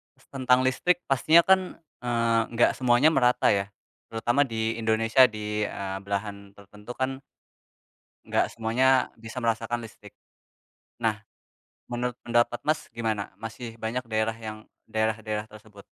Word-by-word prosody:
s -, -, -26 dB
tentang 130 Hz, -1 st, +3 dB
listrik 175 Hz, +7 st, +1 dB
pastinya 155 Hz, +5 st, +5 dB
kan, 190 Hz, 0 st, +6 dB, 0.4 s
eee, 115 Hz, -1 st, +1 dB
nggak 120 Hz, -, +4 dB
semuanya 125 Hz, +4 st, +4 dB
merata, 125 Hz, -5 st, +3 dB
ya. 100 Hz, 0 st, 0 dB, 0.4 s
Terutama 120 Hz, +4 st, +1 dB
di 115 Hz, -1 st, -2 dB
Indonesia 115 Hz, +3 st, +4 dB
di, 105 Hz, -1 st, -3 dB
eee, 95 Hz, -1 st, -5 dB
belahan 100 Hz, 0 st, -5 dB
tertentu 105 Hz, +4 st, -11 dB
kan, 130 Hz, 0 st, -2 dB, 1.1 s
nggak -, -, +2 dB
semuanya 125 Hz, +4 st, +2 dB
bisa 115 Hz, +3 st, -7 dB
merasakan 115 Hz, +1 st, -1 dB
listrik. 105 Hz, -2 st, -14 dB, 0.9 s
Nah, 110 Hz, -2 st, 0 dB, 0.7 s
menurut 120 Hz, 0 st, -2 dB
pendapat 120 Hz, 0 st, +1 dB
Mas 155 Hz, +1 st, 0 dB
gimana? 110 Hz, -4 st, -3 dB
Masih 115 Hz, +1 st, -7 dB
banyak 115 Hz, +3 st, -3 dB
daerah 110 Hz, 0 st, 0 dB
yang 110 Hz, -1 st, -8 dB, 0.2 s
daerah-daerah 110 Hz, -1 st, -2 dB
tersebut? 105 Hz, -1 st, -15 dB
115 Hz, 130 wpm, -26 LUFS, 110-125 Hz, 1.1 s, kan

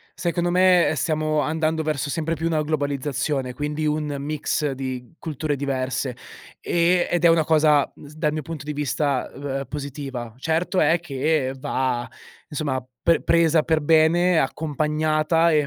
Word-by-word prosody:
Secondo 175 Hz, 0 st, -1 dB
me 180 Hz, -1 st, +4 dB
stiamo 155 Hz, +1 st, 0 dB
andando 160 Hz, +1 st, 0 dB
verso 150 Hz, -2 st, -1 dB
sempre 165 Hz, +2 st, -1 dB
più 165 Hz, +1 st, -3 dB
una 160 Hz, -2 st, +1 dB
globalizzazione, 145 Hz, -3 st, -2 dB
quindi 150 Hz, +3 st, -2 dB
un 150 Hz, -1 st, -1 dB
mix 150 Hz, +1 st, -1 dB
di 130 Hz, -1 st, -6 dB
culture 155 Hz, -1 st, -3 dB
diverse, 130 Hz, -2 st, -2 dB, 0.4 s
ehm, 175 Hz, +1 st, +2 dB
ed 175 Hz, -1 st, 0 dB
è -, -, +8 dB
una 165 Hz, -1 st, +4 dB
cosa, 150 Hz, -2 st, +4 dB
uhm, -, -, -14 dB
s 145 Hz, -, -13 dB
dal 150 Hz, -1 st, 0 dB
mio 155 Hz, 0 st, -3 dB
punto 150 Hz, -1 st, -7 dB
di 150 Hz, -, -3 dB
vista, 145 Hz, -2 st, -1 dB
ehm, 135 Hz, 0 st, -4 dB
positiva. 135 Hz, -5 st, -6 dB
Certo 165 Hz, +6 st, 0 dB
è 160 Hz, +3 st, +4 dB
che 140 Hz, -3 st, -1 dB
va, 130 Hz, -3 st, -1 dB, 0.4 s
insomma, 140 Hz, -4 st, -2 dB, 0.2 s
pe 170 Hz, -, +2 dB
presa 165 Hz, -1 st, +3 dB
per 160 Hz, 0 st, +1 dB
bene, 160 Hz, +3 st, +4 dB
accompagnata 155 Hz, +2 st, +1 dB
e 150 Hz, -2 st, +3 dB
150 Hz, 155 wpm, -23 LUFS, 140-160 Hz, 0.4 s, è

